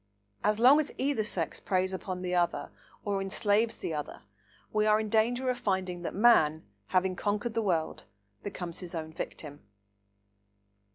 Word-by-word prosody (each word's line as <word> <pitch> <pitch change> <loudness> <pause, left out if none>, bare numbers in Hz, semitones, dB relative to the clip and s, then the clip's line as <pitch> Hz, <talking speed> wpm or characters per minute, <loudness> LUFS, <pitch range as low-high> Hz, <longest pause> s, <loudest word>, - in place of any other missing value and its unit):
So 210 - +4
long 260 +5 +7
as 300 - -1
either 265 -4 0
sex 175 -6 -2
preys 185 0 0
upon 185 -1 -4
the 180 0 -2
other, 175 -1 0 0.3
or 200 -1 0
enslaves 205 +3 +1
the 165 - -4
other, 150 -2 -5 0.5
we 215 0 +2
are 215 0 +5
in 215 -1 -3
danger 235 +4 +2
of 250 - -5
finding 185 -4 -1
that 175 - -4
man, 175 -8 +4 0.2
having 185 - +1
conquered 210 +4 -1
the 230 - 0
world, 170 -6 -1 0.4
becomes 180 -4 -6
his 180 -1 -7
own 160 -1 -5
victim. 150 -2 -7
195 Hz, 160 wpm, -30 LUFS, 175-220 Hz, 0.5 s, long